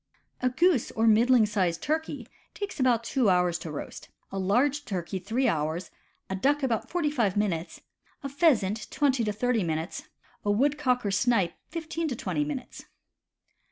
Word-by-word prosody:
A 255 - +2
goose 315 0 +2
or 225 - 0
a - - +4
middling 230 +1 +5
sized 185 -5 -1
turkey 315 +2 -2 0.3
takes 405 -6 -5
about 245 -3 +3
two 245 -2 +1
hours 180 -2 +2
to 160 -1 -6
roast, 145 - -7 0.2
a 195 - -3
large 260 +10 +2
turkey 190 -2 -4
three 225 +8 0
hours, 160 +3 -1 0.4
a 190 - -3
duck 280 +8 +1
about 235 -5 -1
forty 325 -4 0
five 220 -9 0
minutes, 185 -5 -2 0.4
a - - -2
pheasant 230 - +2
twenty 270 -5 +1
to 210 - 0
thirty 235 +2 0
minutes, 160 +1 -4 0.3
a 205 - -1
woodcock 255 +2 +2
or 200 - 0
snipe 205 -4 +2 0.2
fifteen 325 0 -3
to 265 - -2
twenty 295 - -1
minutes. 290 -3 -6
230 Hz, 165 wpm, -27 LUFS, 190-280 Hz, 0.4 s, middling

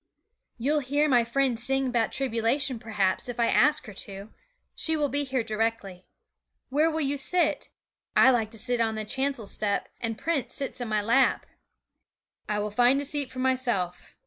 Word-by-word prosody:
'You'll 285 +6 +1
hear 290 +2 +1
my 245 -4 +4
friend 245 0 0
sing 270 +3 +1
about 240 -3 0
tribulation, 255 +1 0
p'raps, 210 -2 -1
if 245 - -6
I 235 - +2
ask 300 +2 +3
her 215 - -9
to; 200 +2 -7 0.4
she 320 -1 +2
will 295 -2 0
be 285 +2 -1
here 260 -3 -2
directly. 215 -4 -3 0.6
Where 300 +5 +2
will 320 0 -2
you 285 0 -1
sit? 350 +6 +2 0.5
I 260 - +7
like 225 -4 0
to 225 - -12
sit 240 +2 +1
on 220 -1 0
the 215 0 -4
chancel 265 0 -2
step, 200 0 -1
and 225 -1 -3
Prince 320 -5 -2
sits 270 -2 -3
in 245 - -3
my 215 -1 0
lap.' 245 +5 +2 1.0
'I 210 - 0
will 210 0 -3
find 245 +5 +3
a 285 - -3
seat 285 -1 -1
for - - -12
myself. 250 -9 -1
245 Hz, 180 wpm, -26 LUFS, 220-275 Hz, 1.0 s, I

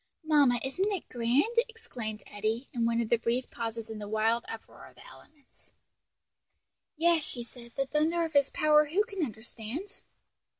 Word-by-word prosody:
"Mamma, 290 -6 +4
isn't 370 +10 0
it 385 -4 -3
grand?" 250 - +2
exclaimed 245 - -6
Eddie, 215 +5 -2
in 235 -2 +1
one 235 0 +2
of 225 - -3
the 235 - +4
brief 240 +2 -1
pauses 230 -1 -4
in 220 -1 -6
the 205 - -6
wild 225 +2 +2
uproar 225 - -9
of - - -18
the - - -15
elements. 305 - -18 1.2
"Yes," 335 0 +4
she 240 -4 -5
said, 235 0 -14
"the 275 - +1
thunder 315 +4 +1
of 320 - -6
his 280 -1 +4
power 300 0 +4
who 350 +8 +2
can 395 -6 -3
understand?" 235 - -6
255 Hz, 170 wpm, -30 LUFS, 230-315 Hz, 1.2 s, Mamma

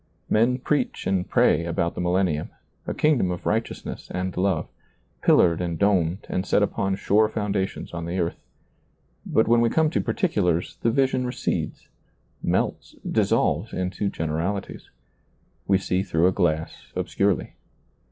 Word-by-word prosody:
Men 120 +4 +3
preach 145 +3 -1
and 95 -1 0
pray 85 - +3
about 85 0 -1
the - - -4
milienium 90 -3 0 0.2
— - - -34
a - - -1
kingdom 150 -11 +2
of 90 -1 -4
righteousness 110 +2 -3
and 90 0 -3
love 95 -3 0 0.3
— - - -41
pillared 85 -1 +4
and 85 -2 -2
domed 95 -2 +1
and 90 - -1
set 100 - +2
upon 95 -1 0
sure 105 +2 +3
foundations 105 -4 -2
on 85 -1 -4
the 90 +2 -3
earth; 85 -2 -1 0.9
but 110 - +2
when 115 +1 +4
we 120 - +3
come 160 +2 +2
to - - +1
particulars, 90 - 0
the 115 - +2
vision 130 0 +1
recedes, 125 0 -3 0.5
melts, - - -1
dissolves - - +1
into 95 +2 -2
generalities. 80 +6 -3 0.8
We 95 - +4
see 95 -1 0
through 85 -3 +1
a 90 - +5
glass 80 -4 -1
obscurely. 100 -3 0
95 Hz, 150 wpm, -24 LUFS, 85-110 Hz, 0.9 s, a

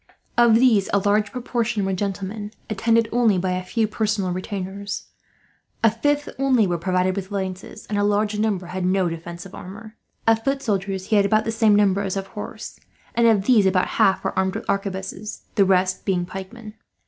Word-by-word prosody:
Of 235 -2 +5
these 225 -5 +4
a - - +5
large 205 +1 +1
proportion 235 -4 -1
were 195 - -1
gentlemen, 200 +2 -3 0.2
attended 225 +2 +2
only 230 -5 +3
by 185 +1 -1
a 180 0 -1
few 220 +4 0
personal 210 -3 -1
retainers. 195 +2 -4 0.8
A 225 - +6
fifth 290 +6 0
only 260 -5 +3
were 175 -2 -1
provided 185 +1 +1
with 195 -1 -4
lances, 190 +1 -5
and 205 -1 -2
a - - +2
large 210 +1 +1
number 205 -4 0
had 185 +1 -4
no 185 0 +2
defensive 170 +2 -8
armour. 215 +4 -10 0.3
Of 225 0 +3
foot 275 0 -1
soldiers 195 -4 -2
he 215 - +4
had 200 - +4
about 215 +1 +2
the 225 - -1
same 220 -2 +4
number 200 -1 +3
as 195 -1 -2
of 195 - -3
horse, 205 +1 -8 0.3
and 235 0 +3
of 210 -4 +3
these 220 -6 +5
about 185 -1 +2
half 190 0 +4
were 190 - -2
armed 190 0 0
with - - -5
arquebuses, 195 +1 -3
the 200 - +4
rest 185 0 +2
being 180 -2 0
pikemen. 200 +4 -9
200 Hz, 190 wpm, -23 LUFS, 190-220 Hz, 0.8 s, A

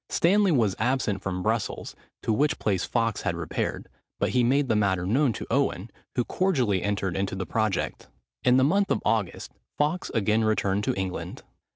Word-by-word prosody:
Stanley 195 +2 +3
was 110 - +2
absent 110 -4 0
from 90 -2 -3
Brussels, 110 0 -2 0.3
to 110 - +1
which 150 +7 +1
place 95 -4 0
Fawkes 115 -3 0
had - - -1
repaired; - - -3 0.3
but - - +1
he 125 -1 +2
made 135 +3 +2
the 110 - +2
matter 95 -4 +1
known 130 +7 +2
to - - -6
Owen, 120 -6 0 0.2
who 125 - +2
cordially 130 - +1
entered 100 -3 -1
into 95 0 -1
the 95 0 -3
project. 110 -2 -1 0.4
In 125 0 +5
the 130 - +4
month 195 +7 +2
of - - 0
August, 110 -6 -1 0.3
Fawkes 150 +5 0
again 110 +1 +2
returned 105 -2 +1
to - - 0
England. 95 -1 -4
110 Hz, 180 wpm, -26 LUFS, 100-135 Hz, 0.4 s, In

